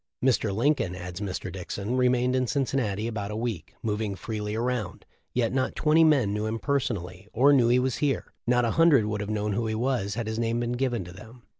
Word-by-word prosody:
Mr. 115 -5 +2
Lincoln," 115 -4 +1
adds 90 +1 -7
Mr. 95 -1 -4
Dickson, 100 +5 -4
"remained 125 0 +2
in 130 -1 +1
Cin 140 +2 +1
cinnati 110 -5 -1
about 105 -3 -4
a 105 - -4
week, 110 -8 -4
moving 105 -2 -1
freely 105 +1 -4
around, 120 -2 -2 0.3
yet 120 -1 0
not 130 -1 0
twenty 160 +1 +4
men 135 -10 +3
knew 105 +1 -1
him 110 +1 -2
personally 100 -9 -2
or 140 +5 +5
knew 125 -4 +5
he 120 +1 +4
was 125 -1 0
here; 140 -4 -1
not 125 0 +3
a 115 - +1
hundred 165 -9 +5
would 105 -1 -2
have 105 - -4
known 105 -1 -1
who 115 +3 -1
he 110 - -1
was 115 -4 -1
had 115 -1 -2
his 110 +1 -3
name 115 0 0
been 120 0 -1
given 125 -4 -1
to 90 - -10
them. 110 +6 -13
115 Hz, 225 wpm, -27 LUFS, 105-125 Hz, 0.3 s, or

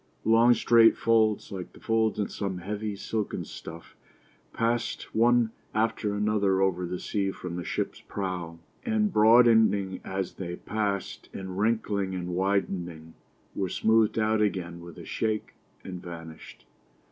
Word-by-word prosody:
Long, 115 +2 +6
straight 115 -1 +5
folds, 110 -2 +2
like 95 -3 -6
the - - -15
folds 110 -1 +1
in 105 -2 0
some 95 -3 -4
heavy 105 +3 -4
silken 105 +1 -3
stuff, 85 +1 -10 0.6
passed 115 +1 -2
one 120 0 +4 0.2
after 110 -1 0
another 105 -2 +1
over 90 -2 +1
the 90 +1 -3
sea 100 0 -1
from 90 -2 -6
the 90 - -4
ship's - - -3
prow, 90 -4 -4 0.3
and 215 -3 +1
broadening 110 -3 +5
as 95 -1 -3
they 85 -2 -5
passed, 100 0 -3
and 95 -1 -5
wrinkling 105 -3 0
and 90 -1 -4
widening, 90 -3 -2 0.4
were 95 -2 -2
smoothed 110 +2 +2
out 110 0 +2
again 90 -5 -1
with 85 -1 -11
a - - -9
shake, 110 -1 -2 0.3
and 90 -2 -7
vanished. 80 -6 -10
100 Hz, 140 wpm, -27 LUFS, 90-110 Hz, 0.6 s, Long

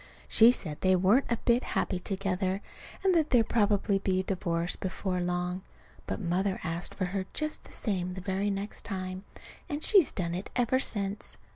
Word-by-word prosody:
She 230 +2 +7
said 155 -11 -3
they 185 0 +4
weren't 200 +9 +3
a 235 - +2
bit 240 +1 +4
happy 185 - -1
together, 190 0 -1 0.4
and 380 -1 +4
that 320 -3 +2
there'd 235 -3 +4
probably 205 -2 +2
be 185 -1 +1
a - - -7
divorce 175 -2 -1
before 185 -1 -3
long. 180 +1 -1 0.5
But - - -3
Mother 190 +1 0
asked 165 +2 -3
for 185 - -1
her 190 +1 -3
just 305 0 -3
the - - -14
same 185 -4 -2
the 185 - -6
very 190 +2 -1
next 200 +1 -3
time. 185 -1 -4 0.4
And 295 +1 -3
she's 390 -8 +5
done 170 -3 -2
it 185 +3 -4
ever 245 +1 +2
since. 205 -5 -2
195 Hz, 180 wpm, -29 LUFS, 185-215 Hz, 0.5 s, She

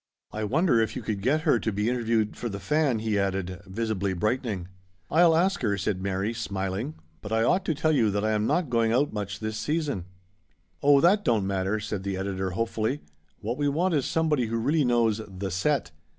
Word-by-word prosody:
I 110 0 -3
wonder 135 - +3
if 110 - -1
you 130 - -5
could 105 -2 -3
get 140 +8 +2
her 150 -7 +3
to 110 - -1
be 105 +2 -1
interviewed 115 -3 0
for 120 - -4
The 100 -2 -5
Fan?" 140 - +1
he 110 -2 0
added, 95 -1 -2
visibly 100 -1 -1
brightening. 105 -1 -1 0.2
" 90 -2 -34
I'll 165 +1 +5
ask 190 +3 +2
her," 100 -5 +1
said 100 -1 -2
Mary, 100 +3 -1
smiling. 100 +4 -3
" 80 -2 -36
But 105 - -8
I 115 0 +2
ought 185 +10 +2
to 160 - 0
tell 155 +2 +1
you 115 -8 +3
that 105 +1 -1
I 110 - +2
am 105 0 +1
not 175 -8 0
going 115 -1 +2
out 135 +3 +2
much 100 -1 -4
this 110 0 -3
season. 140 - -2 0.4
" 85 -2 -42
Oh! 140 -1 +6
that 200 +5 +4
don't 110 - +2
matter," 95 +2 0
said 105 -2 -4
the 95 -1 -3
editor 95 0 -2
hopefully. 115 +7 -1 0.4
"What 120 +6 -3
we 145 - +2
want 170 +5 +1
is 145 -4 +1
somebody 155 -7 +1
who 115 +1 -1
really 145 +7 +2
knows 115 -3 +2
the 95 0 -5
set. 125 +10 0
110 Hz, 220 wpm, -27 LUFS, 100-140 Hz, 0.4 s, Oh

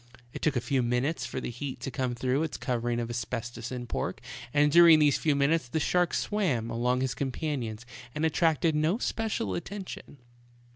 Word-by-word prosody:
It - - -7
took 150 -3 +1
a 120 - +1
few 135 -1 +1
minutes 125 +6 0
for - - -4
the 125 - -4
heat 130 +1 -6
to 135 - -4
come 130 -2 -2
through 130 +4 0
its 160 -2 -2
covering 120 -2 -1
of 120 0 -3
asbestos 120 0 -4
and 125 -1 -5
pork, 90 - -3 0.3
and 145 +1 +3
during 170 0 +8
these 150 -2 +3
few 150 -3 +2
minutes 140 0 +2
the 160 - -1
shark 175 +3 +1
swam 145 - 0
among 125 +2 +1
his 130 -1 0
companions 130 -5 -3 0.3
and 155 +1 0
attracted 160 0 +2
no 155 +6 +2
special 220 - -2
attention. 185 - -7
135 Hz, 185 wpm, -28 LUFS, 120-160 Hz, 0.3 s, during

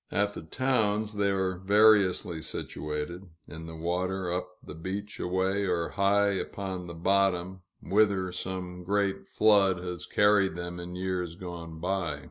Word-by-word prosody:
At 105 0 +1
the - - -7
towns, 110 +2 +1
they 100 -1 +1
are 95 -2 0
variously 100 -4 +4
situated: 75 +5 -4 0.2
in 80 +2 -8
the 80 - -8
water, 90 +2 -1
up 90 0 -2
the - - -8
beach 95 +5 -5
a - - -2
way, 95 +2 0
or 85 -2 0
high 100 0 +3
upon 95 -2 -4
the 85 - -7
bottom, 95 0 +1 0.2
whither 100 -2 +2
some 90 -1 -5
great 100 +1 0
flood 100 -4 +4
has 90 -2 -6
carried 105 -2 +3
them 85 0 -5
in 90 +1 -6
years 90 -2 -2
gone 85 -3 -8
by. 85 -4 -1
95 Hz, 150 wpm, -29 LUFS, 90-100 Hz, 0.2 s, variously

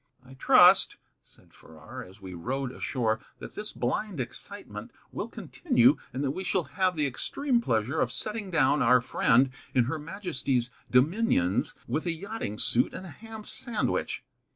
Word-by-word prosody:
"I 130 - -13
trust," 130 - +6 0.2
said - - -24
Farrar, 80 0 -11
as 95 +3 -15
we 95 -2 -9
rowed 125 +9 -3
ashore, 115 -4 -1 0.2
"that - - -9
this 210 0 -5
blind 210 -7 -2
excitement 125 - -4 0.2
will - - -4
continue, 125 +5 +2
and 130 +3 -3
that 135 - +1
we 185 - -5
shall 185 -1 0
have 185 +1 +1
the 150 -2 +1
extreme 245 - 0
pleasure 120 - 0
of - - +1
setting 215 -2 -3
down 150 -4 +3
our 125 +1 +6
friend 125 +1 +3 0.2
in 125 - +5
Her 150 +7 -3
Majesty's 140 - -2 0.2
dominions 125 - +2
with 155 +8 -2
a - - +2
yachting 175 - -5
suit 120 +3 +2
and 190 - -7
a - - -8
ham 220 +4 -10
sandwich." 240 +1 -2
135 Hz, 160 wpm, -28 LUFS, 120-190 Hz, 0.2 s, trust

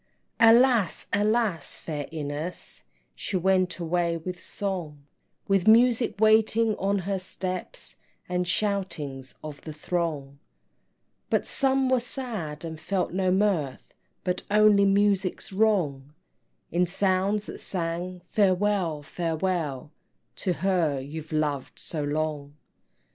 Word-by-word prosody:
Alas, 230 -4 +5
alas, 210 -3 +1
fair 150 -3 -5
Ines, 155 +2 -5 0.3
She 190 - -3
went 185 0 +2
away 170 0 0
with 180 +2 -6
song, 170 -8 -5 0.4
With 195 -1 +2
Music 235 +1 +5
waiting 220 +1 +4
on 200 +1 +1
her 195 +1 -2
steps, 185 0 -5 0.3
And 180 0 -1
shoutings 170 -10 -2
of 150 -2 -8
the 155 - -7
throng; 150 -4 -3 0.9
But - - +1
some 270 -1 +1
were 255 -1 +3
sad, 215 - -5
and 160 -1 -6
felt 180 +2 -1
no 185 0 +1
mirth, 185 -8 0 0.3
But 180 -1 -1
only 210 -1 +5
Musics 195 -1 +1
wrong, 165 -10 +1 0.6
In 175 +1 +2
sounds 195 +3 +1
that - - -8
sang 175 0 -4
Farewell, 185 -5 +1
Farewell, 160 -4 -2 0.5
To 185 - 0
her 170 -5 +1
you've 155 +4 -7
loved 150 -3 -1
so 155 -3 -4
long. 145 -1 -2
180 Hz, 115 wpm, -26 LUFS, 155-205 Hz, 0.9 s, Alas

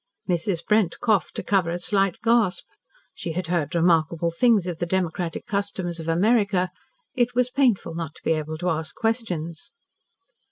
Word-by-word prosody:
Mrs. 175 -1 -1
Brent 210 -5 +2
coughed 215 -8 +1
to - - -3
cover 190 -4 +2
a 170 - -1
slight 195 0 +1
gasp. 230 -5 +2 0.5
She 165 - -5
had 180 +2 -2
heard 170 -1 -1
remarkable 170 0 +2
things 215 +1 +3
of 175 -3 -4
the 175 - -1
democratic 175 -2 -2
customs 195 -4 -3
of 160 - -7
America. 195 +1 +2 0.4
It 245 -1 0
was 250 0 +2
painful 250 -11 +2
not 165 -1 -5
to - - -17
be - - +1
able 155 0 -2
to 180 +3 -1
ask 155 -2 -3
questions. 180 - -3
180 Hz, 165 wpm, -24 LUFS, 165-210 Hz, 0.5 s, things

